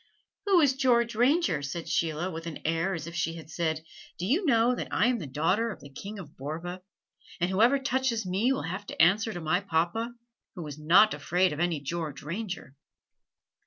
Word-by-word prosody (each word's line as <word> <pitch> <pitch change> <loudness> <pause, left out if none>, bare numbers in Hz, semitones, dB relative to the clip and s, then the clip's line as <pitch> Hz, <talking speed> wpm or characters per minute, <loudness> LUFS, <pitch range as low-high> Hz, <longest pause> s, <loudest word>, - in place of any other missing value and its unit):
"Who 385 -3 +6
is 280 -3 +4
George 240 -3 +2
Ranger?" 240 - +2
said 150 +4 -5
Sheila 165 +3 0
with 165 0 -6
an 165 - -5
air 165 +4 0
as 160 - -5
if 170 - -8
she 165 -1 -1
had 160 -1 -10
said, 160 -2 -1 0.3
"Do 175 - -3
you 315 - +1
know 235 -1 +4
that - - -4
I - - +2
am 245 -2 0
the 160 - -6
daughter 175 - +1
of 200 - -9
the 140 -1 -13
King 200 +9 -8
of 165 -7 -10
Borva, 165 +6 -5 0.6
and 175 +1 +1
whoever 230 +8 +4
touches 260 -4 0
me 195 +8 +1
will 270 - -1
have 190 +5 -5
to - - -8
answer 205 +6 +4
to 175 - -5
my 165 +2 +1
papa, 195 +6 0 0.4
who 175 -4 -6
is 150 0 -7
not 180 +8 +6
afraid 175 +4 +1
of 150 - -6
any 175 -3 +1
George 150 -1 -4
Ranger?" 180 - -5
180 Hz, 200 wpm, -28 LUFS, 160-230 Hz, 0.6 s, Who